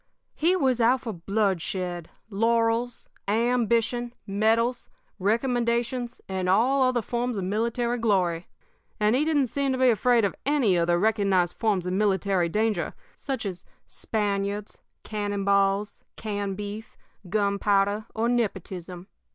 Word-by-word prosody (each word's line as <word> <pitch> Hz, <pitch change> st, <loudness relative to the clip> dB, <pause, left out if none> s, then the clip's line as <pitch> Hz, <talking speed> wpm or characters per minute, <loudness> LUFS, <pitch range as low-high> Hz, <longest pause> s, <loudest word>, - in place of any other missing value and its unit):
"He 345 Hz, +4 st, +2 dB
was 260 Hz, -8 st, +1 dB
out 245 Hz, +3 st, +4 dB
for 225 Hz, -4 st, -4 dB
bloodshed, 180 Hz, -2 st, -2 dB, 0.2 s
laurels, 230 Hz, +3 st, +1 dB, 0.2 s
ambition, 235 Hz, +2 st, +1 dB
medals, 225 Hz, +5 st, +1 dB, 0.3 s
recommendations, 235 Hz, +3 st, 0 dB
and 185 Hz, -1 st, -2 dB
all 250 Hz, +8 st, +3 dB
other 255 Hz, -2 st, +2 dB
forms 240 Hz, +1 st, -2 dB
of 195 Hz, -, -2 dB
military 235 Hz, +5 st, -1 dB
glory. 180 Hz, -6 st, +1 dB, 0.5 s
And 210 Hz, +2 st, +3 dB
he 275 Hz, -, +2 dB
didn't 300 Hz, -3 st, +2 dB
seem 275 Hz, +3 st, -1 dB
to -, -, -1 dB
be 255 Hz, -1 st, +5 dB
afraid 235 Hz, +1 st, +3 dB
of 195 Hz, -, -1 dB
any 270 Hz, -9 st, +2 dB
of 170 Hz, -1 st, +1 dB
the 175 Hz, 0 st, +3 dB
recognized 195 Hz, -3 st, +2 dB
forms 205 Hz, -6 st, 0 dB
of 180 Hz, -, -2 dB
military 190 Hz, -3 st, +1 dB
danger, 215 Hz, -1 st, 0 dB, 0.2 s
such 265 Hz, -5 st, -4 dB
as 180 Hz, -3 st, -5 dB, 0.2 s
Spaniards, 205 Hz, -1 st, -3 dB, 0.2 s
cannon 205 Hz, -2 st, -3 dB
balls, 200 Hz, +1 st, +1 dB
canned 205 Hz, -3 st, -3 dB
beef, 210 Hz, +2 st, -7 dB, 0.3 s
gunpowder, 200 Hz, 0 st, +1 dB
or 225 Hz, +1 st, +1 dB
nepotism. 190 Hz, -6 st, -3 dB
215 Hz, 130 wpm, -26 LUFS, 195-240 Hz, 0.5 s, be